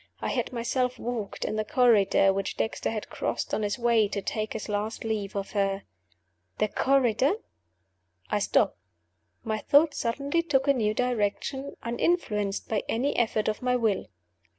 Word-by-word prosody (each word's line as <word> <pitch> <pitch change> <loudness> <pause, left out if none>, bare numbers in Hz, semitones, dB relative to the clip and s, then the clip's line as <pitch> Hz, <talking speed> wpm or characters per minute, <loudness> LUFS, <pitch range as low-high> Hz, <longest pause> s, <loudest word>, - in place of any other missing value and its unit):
I - - -2
had - - -1
myself 250 +1 -1
walked 230 -4 -4
in 215 - -2
the 215 - +1
corridor 220 -7 +4
which 195 0 -3
Dexter 220 - -1
had 220 -2 -5
crossed - - -3
on - - +1
his 205 +2 -1
way 235 -3 +3
to 200 - -3
take 215 +2 -3
his 220 - -5
last 210 +1 -2
leave 215 -3 -2
of 195 -1 -3
her. 195 -1 0 0.7
The 215 - +1
corridor? 265 - +3 0.9
I - - 0
stopped. - - +2 0.6
My 220 -2 -2
thoughts 290 +7 +4
suddenly 280 +7 0
took 285 -4 +1
a 280 - +6
new 215 -4 0
direction, 250 +4 -1
uninfluenced 230 - 0
by 215 -2 0
any 260 +6 0
effort 220 -2 +1
of 215 -1 -1
my 250 0 +1
will. 220 -5 0
225 Hz, 160 wpm, -27 LUFS, 210-255 Hz, 0.9 s, a